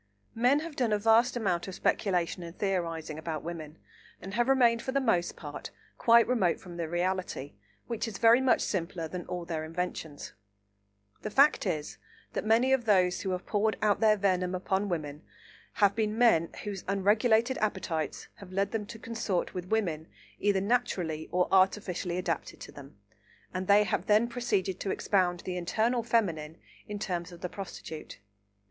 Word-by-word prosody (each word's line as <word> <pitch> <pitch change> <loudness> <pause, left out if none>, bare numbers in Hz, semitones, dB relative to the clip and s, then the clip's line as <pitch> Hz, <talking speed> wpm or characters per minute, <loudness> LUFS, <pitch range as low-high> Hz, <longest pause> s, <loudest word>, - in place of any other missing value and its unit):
Men 250 +6 +3
have 325 -2 -7
done 245 -5 0
a 210 - +3
vast 225 +4 +4
amount 180 -6 -1
of 190 - -6
speculation 180 -4 0
and 170 +1 -9
theorising 165 -5 -2
about 160 -2 -4
women, 160 -2 -7 0.4
and 190 +2 -8
have 240 +4 +1
remained 240 -3 +4
for 260 - -3
the 275 - +2
most 200 -10 +1
part 145 -2 -8 0.3
quite 235 0 +6
remote 225 -9 +1
from 175 -2 -10
the 165 -2 -3
reality, 175 -5 -2 0.3
which 230 -1 -3
is 210 -3 -6
very 230 +3 +6
much 260 -2 +3
simpler 170 -3 -2
than 180 +2 -7
all 175 -1 -4
their 160 -2 -3
inventions. 165 -2 -5 0.9
The 215 - -4
fact 275 -1 +4
is 155 -4 -3 0.3
that - - -2
many 240 +4 +4
of 255 -3 +1
those 185 -4 +3
who 195 - -3
have 185 0 -3
poured 215 0 0
out 210 -1 +2
their 215 -1 +4
venom 185 -2 +1
upon 190 +2 -1
women 150 -4 -4 0.5
have 200 -2 +3
been 215 -1 -1
men 225 -9 +4
whose 200 -3 -5
unregulated 220 +5 +2
appetites 185 -7 -2
have 195 -2 -12
led 195 +1 0
them 215 -3 -3
to 225 - -8
consort 220 -5 -2
with 180 0 -6
women 170 -8 -1 0.3
either 200 -2 +2
naturally 185 -8 -1
or 180 0 +2
artificially 190 -2 +2
adapted 175 -2 -3
to - - -9
them, 140 -6 -13 0.6
and 185 0 -3
they 205 +1 +6
have 210 - -2
then 215 +3 +4
proceeded 210 -7 -1
to 195 - -3
expound 180 -3 +1
the 180 -1 -4
eternal 225 +7 +1
feminine 175 -10 0 0.3
in 210 - -4
terms 180 -4 -3
of 175 - -12
the 180 - -3
prostitute. 170 -5 -8
190 Hz, 175 wpm, -29 LUFS, 175-220 Hz, 0.9 s, quite